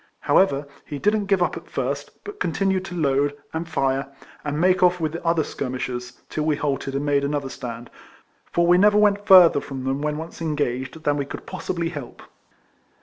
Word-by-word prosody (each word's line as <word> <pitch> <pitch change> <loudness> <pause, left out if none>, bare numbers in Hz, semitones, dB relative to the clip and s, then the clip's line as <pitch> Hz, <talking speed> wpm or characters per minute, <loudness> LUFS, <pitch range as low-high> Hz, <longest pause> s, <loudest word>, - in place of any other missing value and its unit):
However, 145 -7 +3 0.2
he 145 - -6
didn't 210 +5 +1
give 195 -3 +3
up - - -1
at - - -10
first, - - -4
but 410 0 -9
continued 190 +3 0
to 180 -2 -7
load, 145 -1 +1 0.2
and 165 +1 -4
fire, 135 -1 0 0.3
and 150 0 -2
make 185 +2 +3
off 180 0 +4
with 155 -2 -1
the 165 - -6
other 165 -2 +2
skirmishers, 125 -2 -5
till 155 - -3
we 155 -1 +2
halted, 140 -2 -2
and 140 +1 -1
made 140 -1 +2
another 140 -1 -2
stand; 120 -2 -7 0.6
for 170 - +2
we 175 +1 +5
never 210 +1 +5
went 205 -1 +3
further 180 -6 +8
from 135 -2 -6
them 135 +2 -1
when 150 0 -1
once 165 +1 -8
engaged, 145 -1 -2
than 145 0 +1
we 140 - -1
could - - -8
possibly 170 -2 -3
help. 145 -7 -8
150 Hz, 195 wpm, -23 LUFS, 140-180 Hz, 0.6 s, further